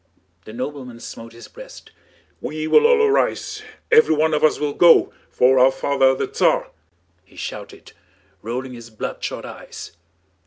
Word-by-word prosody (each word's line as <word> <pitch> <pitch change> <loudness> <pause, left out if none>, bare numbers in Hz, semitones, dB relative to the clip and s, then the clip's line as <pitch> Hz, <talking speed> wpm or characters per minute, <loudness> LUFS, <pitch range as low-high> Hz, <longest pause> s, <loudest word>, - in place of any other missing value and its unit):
The - - -10
nobleman 125 -1 -7
smote 115 0 -10
his 115 - -13
breast. - - -14 0.5
"We 155 0 -5
will 455 - +5
all 465 -1 +4
arise, 420 0 0 0.3
everyone 160 - +4
of 150 - 0
us 155 - +3
will 150 -1 -2
go, 170 -2 +5 0.2
for 130 +1 +3
our 130 +1 +5
father 135 0 +1
the - - -2
Tsar!" - - 0 0.5
he 95 - -24
shouted, - - -9 0.5
rolling 125 +3 -5
his 115 -1 -11
bloodshot 110 - -6
eyes. - - -10
140 Hz, 145 wpm, -20 LUFS, 125-175 Hz, 0.5 s, will